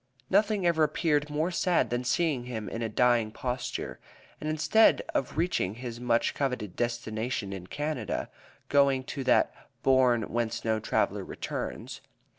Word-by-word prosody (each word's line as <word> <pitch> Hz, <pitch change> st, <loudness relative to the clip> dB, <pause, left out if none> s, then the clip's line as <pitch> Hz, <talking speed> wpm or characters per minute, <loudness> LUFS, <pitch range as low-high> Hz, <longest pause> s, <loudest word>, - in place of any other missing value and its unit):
Nothing 205 Hz, -1 st, +3 dB
ever 170 Hz, -2 st, +3 dB
appeared 150 Hz, -1 st, +1 dB
more 155 Hz, +4 st, 0 dB
sad 180 Hz, -4 st, +1 dB
than 120 Hz, +1 st, 0 dB
seeing 130 Hz, -1 st, +1 dB
him 110 Hz, -4 st, -5 dB
in 115 Hz, -, -5 dB
a 115 Hz, -, -1 dB
dying 120 Hz, 0 st, +3 dB
posture, 125 Hz, +1 st, -4 dB, 0.4 s
and 155 Hz, -, -3 dB
instead 160 Hz, +8 st, +4 dB
of 135 Hz, -, -1 dB
reaching 160 Hz, -, 0 dB
his 120 Hz, -1 st, -6 dB
much 120 Hz, -1 st, +1 dB
coveted 125 Hz, -9 st, -2 dB
destination 115 Hz, -3 st, -2 dB
in 90 Hz, -2 st, -7 dB
Canada, 145 Hz, -3 st, -3 dB, 0.4 s
going 140 Hz, -2 st, +3 dB
to 135 Hz, +1 st, -5 dB
that 125 Hz, -, +4 dB, 0.3 s
"bourne 130 Hz, -3 st, +4 dB
whence 115 Hz, 0 st, -2 dB
no 110 Hz, -1 st, +1 dB
traveler -, -, 0 dB
returns." -, -, -5 dB
125 Hz, 145 wpm, -29 LUFS, 115-150 Hz, 0.4 s, instead